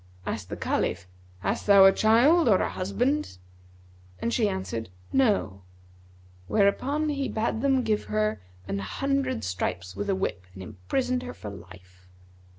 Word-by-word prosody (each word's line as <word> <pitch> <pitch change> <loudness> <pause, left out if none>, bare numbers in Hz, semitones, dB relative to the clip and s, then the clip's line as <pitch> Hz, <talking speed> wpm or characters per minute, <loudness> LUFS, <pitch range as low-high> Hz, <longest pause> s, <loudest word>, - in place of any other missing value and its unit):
Asked 100 -4 -4
the 105 - -5
Caliph 90 - -1 0.3
'Hast - - -2
thou 200 -1 +8
a 195 - +8
child 240 - +4
or 190 - +5
a - - 0
husband?'; 245 - -1 0.8
and 235 - -2
she 220 -5 +2
answered 185 - -4 0.2
'No;' 205 - +1 0.9
whereupon 270 - +1
he 280 -2 -1
bade 225 0 -1
them 270 -2 +2
give 215 -2 0
her 215 - -1 0.3
an 100 - -2
hundred 275 - -1
stripes 90 0 -3
with 205 - -4
a 195 - +2
whip 95 - -3
and 95 - -8
imprisoned 110 - -2
her 250 0 -7
for 105 - -8
life. 90 -1 -14
200 Hz, 150 wpm, -26 LUFS, -, 0.9 s, thou